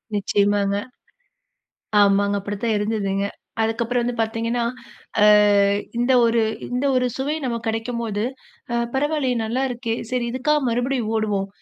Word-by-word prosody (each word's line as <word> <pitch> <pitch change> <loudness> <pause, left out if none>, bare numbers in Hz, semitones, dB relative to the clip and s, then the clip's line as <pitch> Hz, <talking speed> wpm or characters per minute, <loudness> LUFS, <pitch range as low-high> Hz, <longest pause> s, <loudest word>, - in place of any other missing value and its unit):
நிச்சயமாங்க, 200 0 +1 1.2
ஆமாங்க. 200 0 +3
அப்படித்தான் 205 +3 -2
இருந்ததுங்க. 200 -2 -1 0.4
அதுக்கப்புறம் 235 +2 0
வந்து 245 +1 -2
பாத்தீங்கன்னா, 230 +2 -1 0.6
அ - - +7 0.7
இந்த 245 +2 +2
ஒரு 230 0 +2 0.3
இந்த 250 +3 0
ஒரு 250 0 +2
சுவை 275 +3 -1
நமக்கு 235 -2 -3
கிடைக்கம்போது, 225 -2 -2 0.5
அ, - - 0 0.2
பரவால்லையே, 280 -2 0
நல்லாருக்கே. 245 0 -2 0.2
செரி, 250 -1 0
இதுக்காக 300 +4 +1
மறுபடியும் 245 -1 -1
ஓடுவோம். 205 -3 -1
230 Hz, 115 wpm, -22 LUFS, 205-250 Hz, 1.2 s, அ